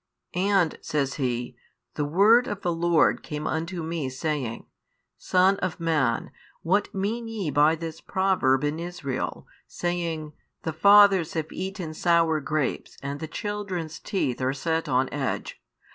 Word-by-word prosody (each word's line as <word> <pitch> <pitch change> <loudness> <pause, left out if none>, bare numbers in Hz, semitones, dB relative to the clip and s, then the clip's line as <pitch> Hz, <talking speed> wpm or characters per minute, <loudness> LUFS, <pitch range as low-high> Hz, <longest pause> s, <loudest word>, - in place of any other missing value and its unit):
And, 185 -2 +2
says 140 -3 -1
he, 125 -1 -2 0.4
the 150 - -1
word 210 - +5
of 205 -4 -4
the 175 - +1
Lord 170 -1 +3
came 150 0 -5
unto 165 +2 -2
me, 160 -4 -3
saying, 130 -3 -3 0.5
Son 185 +2 +3
of 185 -4 -3
man, 150 -9 0 0.3
what 195 +5 +1
mean 220 +5 -2
ye 210 -9 -3
by 150 +3 +4
this 165 0 -7
proverb 185 -9 +2
in 150 +2 -1
Israel, 165 -7 -4 0.2
saying, 165 -3 -3 0.3
The 160 - -2
fathers 200 0 +6
have 160 -1 -3
eaten 190 -4 -5
sour 165 -1 +3
grapes 150 -1 -2
and 140 +1 -4
the 160 - -5
children's 195 -5 -4
teeth 135 - -2
are 130 +1 +1
set 160 +3 -1
on 130 +1 +2
edge? 140 -2 -3
165 Hz, 145 wpm, -26 LUFS, 150-190 Hz, 0.5 s, fathers